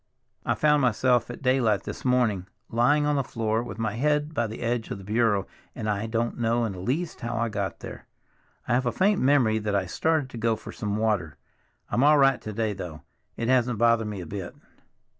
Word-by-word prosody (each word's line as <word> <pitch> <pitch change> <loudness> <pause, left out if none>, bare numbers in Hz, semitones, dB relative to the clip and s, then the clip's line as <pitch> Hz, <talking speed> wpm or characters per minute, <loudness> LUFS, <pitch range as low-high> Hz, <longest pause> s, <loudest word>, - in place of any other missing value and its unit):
I - - +2
found 150 -1 +3
myself 125 -1 +2
at 120 - -8
daylight 125 -6 +2
this - - -7
morning 120 -8 +1 0.2
lying 145 +6 +3
on 150 -1 +1
the 140 - +1
floor 115 -2 -1
with 120 - -7
my 110 -3 -1
head 150 +5 0
by 120 -6 0
the 110 - -8
edge 120 -1 -1
of - - -4
the 95 - -11
bureau, 105 -1 +1 0.3
and 110 - -4
I 105 +1 -1
don't 115 +1 -2
know 115 0 +1
in 110 - -2
the 95 - -8
least 145 - -2
how 120 0 -3
I 115 0 0
got 100 -2 -4
there. - - -9 0.6
I - - +1
have 125 +1 +1
a - - +2
faint 200 - +2
memory 130 -5 +3
that 105 -1 -2
I 95 -2 +1
started 150 - 0
to 115 - -7
go 115 0 +2
for - - -9
some 105 -1 -3
water. 100 -9 0 0.5
I'm 125 - +1
all 150 +1 +6
right 135 -2 +4
to 110 - -6
day, 110 0 -1
though; 85 -5 -8 0.3
it 115 - -2
hasn't 125 -2 +2
bothered 115 -1 +3
me 105 -3 -5
a - - -7
bit." 95 +1 -6
115 Hz, 220 wpm, -26 LUFS, 105-130 Hz, 0.6 s, all